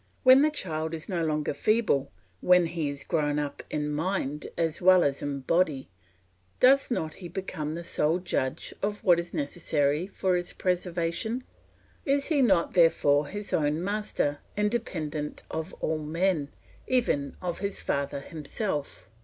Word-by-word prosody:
When 260 +1 +8
the 305 - +4
child 160 - -3
is 160 - -7
no 175 -4 -1
longer 155 -2 0
feeble, 145 -6 +1 0.3
when 180 -1 +5
he 165 -3 -2
is 140 0 -5
grown 150 -3 0
up 145 -1 -3
in 150 0 -2
mind 150 -3 -2
as 165 0 -1
well 185 0 +6
as 140 -1 0
in 140 -1 -3
body, 150 - +1 0.7
does 270 +2 +5
not 160 -10 -2
he 180 - -8
become 160 -4 -4
the 170 - -5
sole 160 0 +1
judge 155 -7 -2
of 205 +2 -2
what 175 -5 +5
is 170 0 -5
necessary 145 +1 0
for 190 -2 0
his 175 0 -2
preservation? 180 +6 -1 0.6
Is 280 +1 +1
he 300 -4 +3
not 190 -9 +3
therefore 150 -4 +4
his 205 +5 -6
own 150 +2 +1
master, 200 -8 -1 0.2
independent 170 -9 -2
of 160 +3 -4
all 160 0 0
men, 160 0 0 0.4
even 230 - +1
of 175 -2 -3
his 200 0 -3
father 140 0 -2
himself? 155 +1 -4
170 Hz, 155 wpm, -28 LUFS, 150-190 Hz, 0.7 s, When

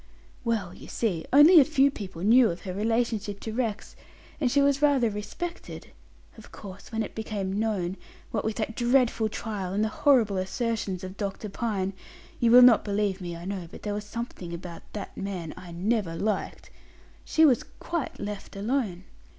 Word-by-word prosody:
"Well, 220 -7 -1
you - - -12
see, 185 -9 -2
only 305 +5 +9
a - - +8
few 275 -1 +3
people 190 -8 -7
knew 235 +3 +6
of 170 - -5
her 185 - -5
relationship 215 -1 -1
to 220 - -5
Rex, 225 -3 -3 0.4
and 270 -5 +2
she 280 - +2
was 280 0 +3
rather 275 -6 +3
respected. 335 - -6 0.5
Of - - -14
course, 195 +1 -11
when 225 -1 -1
it - - -7
became 205 -3 -3
known, 195 -4 -1 0.3
what 215 - -1
with 220 0 -2
that 225 0 -3
dreadful 240 -2 +2
trial 205 -4 -4
and 205 +2 +1
the 220 - +1
horrible 225 -6 +3
assertions 195 -1 -2
of 185 +1 -7
Dr. 205 +1 -4
Pine 200 -3 -2 0.5
you 235 - +3
will 250 +2 +9
not 245 -3 +7
believe 200 -2 -1
me, 175 -1 -5
I 170 - -9
know, 190 -3 -4
there 205 +4 -6
was 205 0 -3
something 205 -5 -6
about 170 0 -8
that 205 -2 -6
man 185 -5 -5
I 180 -1 -10
never 185 0 -1
liked 205 +3 -3 0.5
she 320 - +4
was 255 -6 +4 0.2
quite 335 -4 -4
left 205 -1 -6
alone. 205 -4 -1
210 Hz, 175 wpm, -27 LUFS, 190-240 Hz, 0.5 s, only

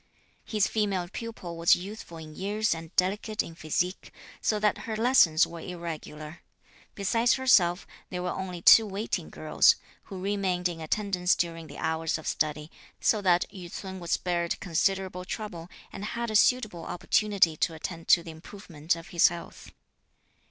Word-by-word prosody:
His 210 -3 +1
female 200 -5 -1
pupil 195 -6 -7
was 165 0 +5
youthful 185 -2 -8
in 155 -1 -10
years 210 +2 0
and 165 0 -8
delicate 205 +3 0
in 165 - -10
physique, 170 +3 -2 0.3
so 215 - +1
that 210 0 +1
her 220 - -1
lessons 220 -9 +5
were 170 0 -9
irregular. 165 -2 -7 0.5
Besides 230 +4 +2
herself, 195 -9 +3 0.2
there 180 -1 -4
were 180 - -1
only 180 -2 -5
two 225 -1 +8
waiting 205 +3 -3
girls, - - +4 0.3
who 190 -3 -8
remained 190 -2 0
in 170 -2 -6
attendance 180 +1 +1
during 165 -2 -3
the - - -11
hours 160 0 -1
of 155 - -11
study, 150 0 -2 0.3
so 215 - +2
that 180 -2 +3
Yü 180 -3 -9
ts'un 190 -1 -7
was 170 -1 -8
spared 170 -1 -1
considerable 185 +1 -1
trouble 180 -4 -6 0.2
and 195 - -7
had 235 +2 -3
a - - -3
suitable 215 -6 +3
opportunity 190 -2 +2
to 165 - 0
attend 165 +1 -6
to 170 - +6
the 165 - -8
improvement 160 -1 -4
of 165 -1 -11
his 170 - +5
health. 170 0 -7
180 Hz, 160 wpm, -28 LUFS, 165-205 Hz, 0.5 s, two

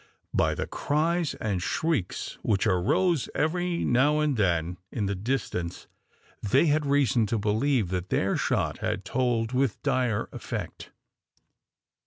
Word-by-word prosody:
By - - +2
the - - -2
cries 160 +2 0
and 100 -5 -2
shrieks 145 - -2
which 100 -1 +1
arose 115 - +2
every 175 +2 0
now 145 +5 +3
and 150 -2 +1
then 90 -4 0
in 105 - -2
the 100 - -1
distance 95 -5 -3 0.6
they 130 +10 +3
had 150 -1 +2
reason 135 -5 +3
to 115 - 0
believe 110 +1 +1
that 90 0 -3
their 95 - +1
shot - - 0
had 95 - -2
told 120 -1 0
with 130 -3 0
dire 130 -6 +1
effect. - - -6
120 Hz, 135 wpm, -27 LUFS, 100-145 Hz, 0.6 s, now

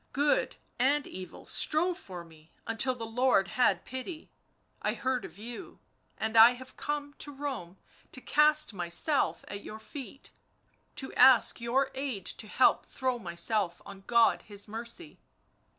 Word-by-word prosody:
Good 290 +2 +1 0.2
and 280 +3 +2
evil 185 0 -9
strove 345 +4 +2
for 180 - -9
me, 160 -1 -19
until 240 +3 +1
the 230 -2 -6
Lord 225 -4 +2
had 250 +6 +2
pity... 260 +6 -7 0.5
I - - -1
heard 260 -1 -1
of 170 - -11
you, 235 +3 -9 0.4
and 220 +1 -2
I 225 +2 +9
have 260 +1 -12
come 290 -1 -3
to 290 - -3
Rome 270 -11 -6 0.3
to - - +2
cast 300 -1 +3
myself 180 - 0
at 200 - -7
your 215 - -8
feet, 265 +3 -8 0.6
to 265 - -1
ask 255 -2 +6
your 260 +3 +1
aid 260 -8 -4
to 215 - -4
help 255 +4 +3
throw 255 -2 -2
myself 175 +1 -1
on 195 -1 -10
God 235 -1 +4
His 205 0 -5
mercy. 235 +9 -6
245 Hz, 150 wpm, -30 LUFS, 205-275 Hz, 0.6 s, I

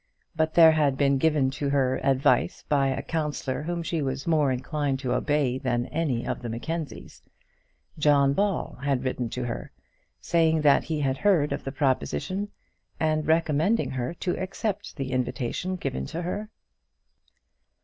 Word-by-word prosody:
But 160 0 0
there 165 -2 +9
had 145 -4 +2
been 140 -1 +3
given 150 -3 +2
to 140 +1 -2
her 130 -2 +1
advice 135 0 +2
by 140 -2 +2
a 135 0 -2
counsellor 150 -4 -2
whom 170 +2 -3
she 165 -1 -2
was 135 0 -3
more 155 -5 +3
inclined 135 +2 -1
to 125 -2 -1
obey 130 -1 +1
than 120 -2 0
any 140 -7 -1
of - - -3
the 120 - -5
Mackenzies. 155 +7 -5 0.8
John 140 -2 +4
Ball 195 -6 -1
had 140 -2 0
written 130 -2 -2
to 125 - -4
her, 120 - -5 0.5
saying 160 -2 +2
that 145 -2 +4
he 155 -2 -2
had 135 -1 0
heard 180 -8 +3
of - - -5
the 135 - -4
proposition, 135 - -1 0.5
and 155 -1 0
recommending 160 +6 +2
her 130 +4 -3
to 180 0 -2
accept 200 +2 -3
the 135 -2 -3
invitation 130 +7 -2
given 65 - -3
to 170 - -4
her. 205 +5 -4
145 Hz, 160 wpm, -26 LUFS, 130-160 Hz, 0.8 s, there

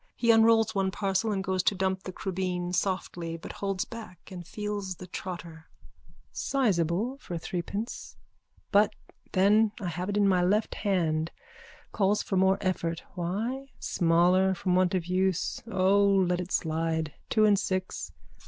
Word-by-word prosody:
He 235 -1 +3
unrolls 225 -1 +5
one 195 -2 +1
parcel 195 +2 0
and 195 -2 -1
goes 185 -1 0
to 200 - +2
dump 190 0 0
the 185 - -4
crubeen 180 -1 -3
softly 175 -3 -2
but 165 - -8
holds 195 -2 -2
back 215 -7 -10
and 175 -2 -8
feels 205 -3 -4
the 180 - -10
trotter.)_ 170 -3 -7 0.7
Sizeable 215 - 0
for 175 - -5
threepence. 185 +7 -5 0.5
But 205 0 +4 0.4
then 205 +3 +4
I 185 -5 -3
have 175 +3 -4
it 205 - -1
in 205 -1 +4
my 185 -2 +3
left 210 +4 +1
hand. 165 -6 0 0.6
Calls 205 0 +1
for 195 - -2
more 190 +1 +4
effort. 170 -3 -1
Why? 220 +10 -3
Smaller 180 +2 +3
from 180 0 -1
want 185 0 +3
of 180 -3 -1
use. 185 0 0
O, 195 +1 +4
let 190 -3 +3
it 180 - -7
slide. 160 -1 -1 0.2
Two 215 -1 +4
and 205 -2 +4
six. 185 -2 -3
190 Hz, 155 wpm, -28 LUFS, 175-205 Hz, 0.7 s, unrolls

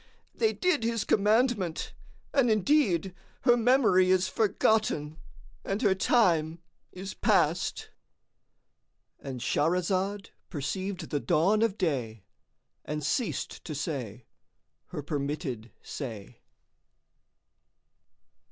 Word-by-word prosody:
They 445 -1 +1
did 360 -9 0
his 230 -2 0
commandment, 210 -4 +1 0.4
and 265 -4 +3
indeed 210 - +2 0.3
her 240 -2 +5
memory 230 -6 +4
is 185 0 +3
forgotten 205 -8 +1 0.4
and 195 +1 -2
her 200 -3 +4
time 170 -6 +2 0.3
is 190 +1 -7
past."——And 130 -3 -4
Shahrazad 185 - 0 0.2
perceived 185 +5 -4
the 145 - 0
dawn 195 +10 +2
of 225 -3 +1
day 120 - -2 0.6
and 150 0 -4
ceased 235 - -2
to 155 - -6
say 125 -7 -4 0.6
her 150 - -6
permitted 140 -5 -4
say. 115 -8 -7
185 Hz, 90 wpm, -28 LUFS, 150-215 Hz, 0.6 s, her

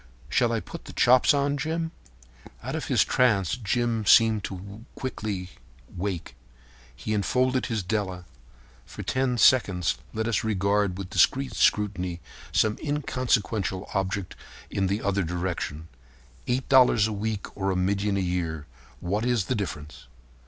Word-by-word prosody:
Shall - - +2
I - - 0
put - - -10
the - - -10
chops 125 +1 +5
on, 140 0 +1
Jim?" 160 +3 -2 0.7
Out - - -4
of - - -3
his - - +3
trance 105 -8 +2
Jim 120 0 -1
seemed 110 -2 +5 0.5
quickly 105 -7 -4
to 90 - -14 0.4
wake. 90 -2 -4 0.6
He 65 +13 -4
enfolded 125 +5 +1
his 110 -4 -2
Della. 95 -3 -2 0.6
For - - -8
ten 130 -1 0
seconds 100 -7 +3
let 110 +1 -2
us 115 - 0
regard 100 -2 +1
with 95 -1 -7
discreet 130 -3 +2
scrutiny 90 -6 +1 0.3
some 110 -1 +2
inconsequential 120 -9 -1
object 95 0 -2 0.4
in 95 -1 0
the 100 +3 -1
other 100 0 +1
direction. 85 -2 -3 0.6
Eight 125 +1 -1
dollars 125 -5 +5
a 110 - -3
week 105 0 -4
or 95 -1 -1
a 95 - 0
million 100 +2 0
a - - 0
year—what 85 - -4
is 120 -5 +1
the 130 - -1
difference? 75 - -6
105 Hz, 140 wpm, -26 LUFS, 95-120 Hz, 0.7 s, chops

